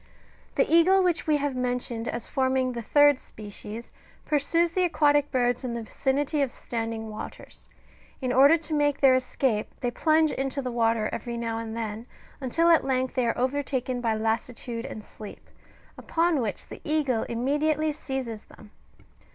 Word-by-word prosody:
The - - +3
eagle 365 +4 +5
which 345 -2 0
we 305 -1 +4
have 285 -2 -2
mentioned 245 -2 -2
as 235 - -4
forming 260 -1 +1
the 235 -1 -5
third 290 +3 +5
species, 215 +2 -9 0.3
pursues 330 +3 +2
the 370 - 0
aquatic 290 -4 +3
birds 245 -1 0
in 240 -2 -3
the 235 - -4
vicinity 280 +6 -1
of 270 -3 0
standing 225 -2 -4
waters: 215 - -9 0.5
in 255 -2 -1
order 280 +6 +7
to 320 -1 -6
make 290 -1 +1
their 270 -2 +6
escape 255 -3 0
they 245 - -1
plunge 315 +3 +3
into 270 +1 -2
the 255 -2 -3
water 225 -2 +1
every 235 -1 -4
now 230 -1 -2
and 225 0 -5
then, 225 +1 -5 0.3
until 330 +6 +2
at 330 - +5
length 260 -1 0
they 250 -2 +1
are 230 - 0
overtaken 255 -1 -1
by 225 -2 +1
lassitude 230 +2 -2
and 215 - -8
sleep, 210 -2 -11 0.5
upon 330 -3 +1
which 220 -3 -4
the - - -10
eagle 290 -7 0
immediately 295 +6 +1
seizes 265 -7 -5
them. 210 -1 -16
255 Hz, 165 wpm, -26 LUFS, 230-290 Hz, 0.5 s, order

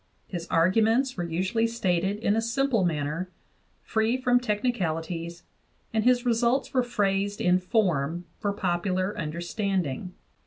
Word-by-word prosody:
His 175 -3 -6
arguments 225 +9 +3
were 175 - -2
usually 185 +7 0
stated 190 -4 0
in 210 -1 +1
a 225 - +2
simple 235 -1 +1
manner, 160 +2 -1 0.5
free 220 +3 +1
from 245 -1 +3
technicalities, 175 -8 -2 0.5
and 220 -1 +1
his 250 0 +3
results 240 +3 +1
were 255 - +4
phrased 200 -4 0
in 180 +1 +3
form 175 - 0
for 205 -2 0
popular 185 0 -1
understanding. 180 - -2
200 Hz, 125 wpm, -27 LUFS, 175-230 Hz, 0.5 s, were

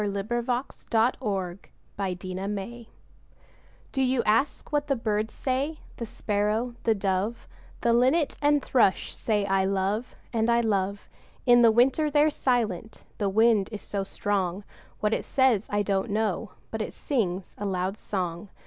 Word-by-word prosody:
ANSWER 200 -1 -1
TO 240 +3 -1
A 245 +2 -1 0.2
CHILD'S 205 -6 0 0.3
QUESTION[386:1] 195 +4 -4 1.1
Do 270 - 0
you 255 -2 +2
ask 225 +10 +1
what 295 -1 0
the 275 - +2
birds 215 -2 -1
say? 275 +4 -1 0.2
The 235 - -4
Sparrow, 215 +4 -1
the 225 -2 +4
Dove, 195 +3 -1 0.3
The 235 - +3
Linnet 265 +6 +3
and 290 -1 +3
Thrush 225 -7 +2
say, 210 -3 0
'I 195 -1 +2
love 195 +4 -1 0.2
and 225 0 +1
I 235 0 +4
love!' 200 -2 -1 0.4
In 240 -1 +7
the 230 -1 +7
winter 265 +7 +3
they're 295 +1 +4
silent 225 - -1 0.2
the 200 -2 +1
wind 220 -1 +3
is 210 - -6
so 200 -1 -2
strong; 195 -1 -1 0.4
What 210 +1 +2
it - - 0
says, 255 -6 +2
I 205 0 +1
don't 195 +2 0
know, 210 -1 -1 0.2
but 220 - -3
it - - -4
sings 195 -9 -2
a 205 - -2
loud 185 0 -1
song. 180 -2 -4
215 Hz, 155 wpm, -27 LUFS, 195-240 Hz, 1.1 s, In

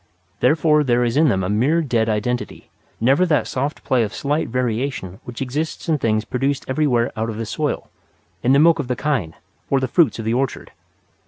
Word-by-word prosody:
Therefore 150 -1 +3
there 125 -2 +2
is 120 0 0
in 155 0 +4
them 95 -5 0
a - - -1
mere 130 - +2
dead 115 -5 0
identity, 110 +3 -3 0.3
never 135 +9 +3
that 150 -4 +2
soft 140 +4 -3
play 130 -3 +2
of 105 -2 -2
slight 145 +3 -1
variation 120 -5 -2
which 120 +2 -5
exists 150 +7 -4
in 155 -3 +1
things 110 -2 0
produced 135 +2 -1
everywhere 130 -4 +1
out 110 +1 -2
of 110 - -5
the 115 - -3
soil, 145 +7 -2 0.5
in 125 - +2
the 135 - +6
milk 165 +2 +5
of 140 - -3
the 125 - -1
kine, 125 - -2 0.3
or 135 - +3
the 130 - -1
fruits 155 -1 +3
of 115 - -5
the 110 - 0
orchard. 130 +1 -2
130 Hz, 200 wpm, -21 LUFS, 115-145 Hz, 0.5 s, the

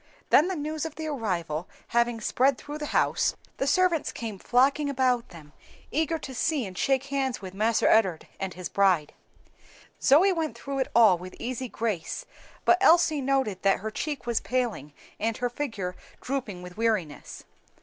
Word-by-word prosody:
Then 310 - +6
the 375 - -2
news 305 0 -3
of 320 -2 -5
the 315 - -5
arrival 180 - -3 0.2
having 235 -1 +1
spread 260 +4 +2
through 295 +1 -7
the 295 - -4
house, - - +1 0.2
the 270 - -1
servants 345 +1 +2
came 220 -4 -6
flocking 275 +6 +2
about 255 -3 +1
them, 155 -4 -14 0.4
eager 320 +3 0
to 270 -3 -8
see 280 +1 0
and 185 -2 -8
shake 270 +6 +1
hands 265 -2 0
with 185 -2 -8
"Marse 220 +3 +1
Ed'ard" 190 -7 +3
and 190 -2 -4
his 180 -1 -5
bride. 185 -7 +2 0.9
Zoe 345 +8 +5
went 320 -3 -3
through 275 -1 -4
it 265 - -1
all 215 -7 +6
with 185 +1 -9
easy 255 +1 -4
grace, 220 - -3 0.4
but 360 - +5
Elsie 335 -5 +5
noted 265 -8 0
that 195 -1 +2
her 220 +1 -4
cheek 290 +4 -4
was 235 -2 +1
paling 240 - -2 0.3
and 225 +1 -1
her 245 -1 -1
figure 225 -10 -4 0.2
drooping 240 -9 -4
with 180 +1 -10
weariness. 215 -10 -2
245 Hz, 170 wpm, -27 LUFS, 195-285 Hz, 0.9 s, Then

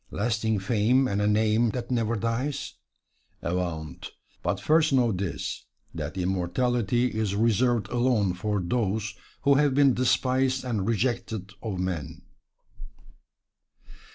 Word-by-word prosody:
Lasting 110 0 0
fame 115 +6 +2
and 100 -2 -1
a 105 - +2
name 110 +2 +3
that 120 +2 -4
never 115 -2 +1
dies? 115 +6 -2 0.7
Avaunt! 85 -5 -3 0.3
but 90 +3 -1
first 155 +6 +3
know 125 -4 +3
this, 95 -3 -4 0.3
that - - -5
immortality 105 +6 0
is 110 -3 -2
reserved 115 0 +2
alone 120 -6 +1
for 105 +3 -1
those 105 +2 -1 0.3
who 140 - +5
have 140 -1 +3
been 140 -2 +5
despised 130 +1 +1
and 110 -6 -1
rejected 115 -4 -1
of 105 -5 -4
men. 90 -5 -4
110 Hz, 120 wpm, -26 LUFS, 100-125 Hz, 0.7 s, who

